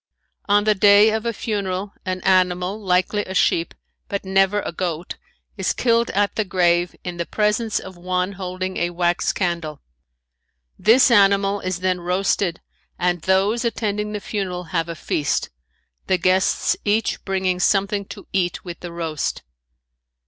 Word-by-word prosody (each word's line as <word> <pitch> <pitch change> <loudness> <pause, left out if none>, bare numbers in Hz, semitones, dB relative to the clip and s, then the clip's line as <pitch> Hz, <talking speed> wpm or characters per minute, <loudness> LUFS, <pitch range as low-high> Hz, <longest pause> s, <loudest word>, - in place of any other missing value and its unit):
On 205 0 +3
the 215 0 +3
day 205 +2 +6
of 220 +1 -2
a - - +1
funeral 200 -3 -3
an 185 0 -2
animal, 185 +2 +1
likely 185 +3 +1
a 190 - -7
sheep, 170 -2 +1 0.3
but 200 -1 -4
never 195 +1 +2
a - - -4
goat, 170 -1 -4 0.4
is 190 -2 0
killed 235 -1 +2
at 205 +1 0
the 215 - +1
grave 175 -2 +1
in 180 -1 -5
the 170 - -2
presence 215 +1 0
of 190 -1 -7
one 180 +1 -1
holding 185 -1 -5
a 175 - 0
wax 175 0 0
candle. 170 -5 -3 1.0
This 245 +4 +5
animal 200 -2 +4
is 185 -1 -4
then 185 -1 0
roasted 180 0 0 0.4
and 175 -1 0
those 195 +6 +2
attending 210 -3 -2
the 210 - -3
funeral 190 -3 -4
have 165 -1 0
a 170 - -4
feast, 150 -2 -1 0.6
the 185 - +3
guests 185 +1 +2
each 215 +1 0
bringing 190 -2 -1
something 200 +1 +1
to - - -10
eat 180 -2 -1
with 175 -2 -7
the 175 - -7
roast. 165 -3 -3
190 Hz, 155 wpm, -21 LUFS, 180-205 Hz, 1.0 s, day